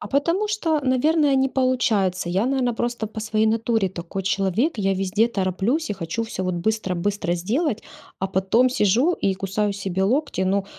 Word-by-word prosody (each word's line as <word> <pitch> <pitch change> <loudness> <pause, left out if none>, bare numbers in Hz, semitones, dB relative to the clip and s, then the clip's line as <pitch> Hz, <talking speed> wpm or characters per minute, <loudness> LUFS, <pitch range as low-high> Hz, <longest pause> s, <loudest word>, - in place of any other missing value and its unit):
А - - -6
потому 335 +9 +1
что, 330 -8 0
наверное, 280 +3 +2
не 265 0 +3
получается. 215 -9 +1
Я, 195 +7 +1
наверное, 260 -2 +1
просто 240 -1 -2
по 215 +1 -7
своей 215 0 0
натуре 225 -3 +1
такой 180 +2 -5
человек: 200 - 0
я 195 -1 +1
везде 195 +4 +1
тороплюсь 205 - -1
и 205 - -1
хочу 190 +5 -3
всё 190 -4 -5
вот 185 - -1
быстро-быстро 190 -1 -1
сделать, 220 - -1 0.4
а 190 - -1
потом 195 +7 +2
сижу 245 - +3
и 195 - 0
кусаю 200 +2 -1
себе 190 -1 -2
локти. 270 +1 0
Ну, 195 +1 +1
215 Hz, 170 wpm, -23 LUFS, 190-255 Hz, 0.4 s, не